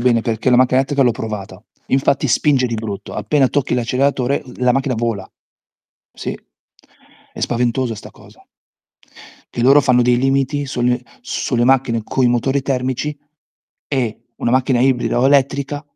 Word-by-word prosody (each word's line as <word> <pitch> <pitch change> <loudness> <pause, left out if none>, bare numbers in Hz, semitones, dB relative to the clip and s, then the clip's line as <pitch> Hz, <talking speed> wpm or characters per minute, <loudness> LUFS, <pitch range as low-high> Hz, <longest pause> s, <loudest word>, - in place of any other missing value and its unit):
bene, 120 -2 +3
perché 115 +2 -1
la 125 - +5
macchina 130 0 +3
elettrica 135 +1 +1
l'ho 125 - +4
provata. 105 -3 -6 0.2
Infatti 135 +1 +1
spinge 135 0 +2
di 115 - -3
brutto, 110 -3 -6
appena 140 -4 +1
tocchi 145 -3 -1
l'acceleratore 130 +2 0
la 125 -1 +2
macchina 135 0 0
vola. 115 -4 -3 0.8
Sì, - - -5 1.0
è - - -9
spaventosa 120 0 0
sta - - -11
cosa. - - -19 1.1
Che 120 - -1
loro 140 +3 +6
fanno 125 -2 +3
dei 120 0 +3
limiti 135 +2 0
sunne 125 -1 0 0.2
sulle 120 0 -1
macchine 125 -3 +2
coi 130 +2 +1
motori 125 +3 +1
termici, 135 +2 -2 0.7
e 120 -5 -2
una - - -1
macchina 130 0 +2
ibrida 125 -2 +1
o 125 - +2
elettrica 140 +1 +1
125 Hz, 145 wpm, -18 LUFS, 120-135 Hz, 1.1 s, loro